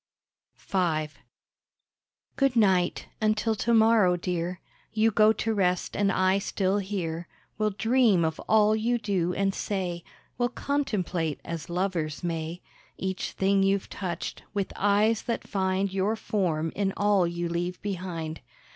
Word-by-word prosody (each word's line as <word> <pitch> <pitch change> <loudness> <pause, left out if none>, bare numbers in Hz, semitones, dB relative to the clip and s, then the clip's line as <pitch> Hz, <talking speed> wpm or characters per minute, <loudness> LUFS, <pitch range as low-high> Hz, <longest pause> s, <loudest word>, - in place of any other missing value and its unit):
V 165 -5 0 1.3
Good 275 -2 +2
night! 190 -5 +3 0.2
until 215 +1 +2
to 220 +2 -1
morrow, 220 -5 +5
dear; 175 0 -3 0.3
You 220 0 +3
go 215 0 +5
to 225 0 -1
rest, 180 -3 0
and 200 -1 +2
I 185 +1 +2
still 195 0 0
here 175 -4 -3 0.3
Will 215 0 +2
dream 215 -3 +3
of 160 - -2
all 215 0 +5
you 235 +3 +1
do 190 -5 -1
and 195 0 +1
say; 180 -5 -3 0.4
Will 245 0 +2
contemplate, 190 - -1
as 170 -2 -5
lovers 170 -4 -2
may, 165 0 -3 0.3
Each 190 0 -3
thing 195 +1 +2
you've 195 0 +1
touched, 180 -3 -4
with 200 -2 -2
eyes 205 +2 +3
that 235 - -3
find 190 0 0
Your 195 +3 +1
form 165 -8 -1
in 195 -1 0
all 205 -3 +3
you 170 0 -3
leave 175 +1 -2
behind. 175 -5 -4
195 Hz, 140 wpm, -27 LUFS, 175-215 Hz, 1.3 s, morrow